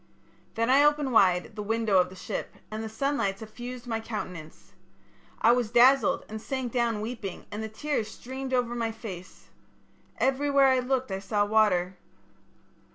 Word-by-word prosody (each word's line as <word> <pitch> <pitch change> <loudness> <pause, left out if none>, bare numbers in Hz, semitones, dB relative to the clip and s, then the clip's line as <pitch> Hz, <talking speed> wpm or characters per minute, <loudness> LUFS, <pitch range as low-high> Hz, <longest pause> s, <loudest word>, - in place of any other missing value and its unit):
"Then 230 +1 +1
I 275 +2 +6
opened 295 -3 +2
wide 185 -1 +3
the 210 - -4
window 220 -2 +2
of 180 0 +2
the 185 - -12
ship, 185 - -5 0.2
and 215 0 -4
the 220 - -5
sunlight 225 -4 -1
suffused 240 +3 -8
my 225 -2 -2
countenance. 180 -8 -7 0.7
I 230 - +5
was 240 -2 +1
dazzled 265 +4 +4
and 220 0 -7
sank 260 -1 -3
down 235 -4 0
weeping 220 -5 -6
and 210 - -4
the 220 - -4
tears 230 0 -2
streamed 260 +4 -7
over 245 -2 +1
my 230 -1 -1
face. 195 -5 -10 0.7
Everywhere 275 0 +3
I 260 -1 +3
looked 255 -2 -1
I 190 - -2
saw 205 +1 0
water. 200 -4 +2
225 Hz, 160 wpm, -27 LUFS, 210-255 Hz, 0.7 s, I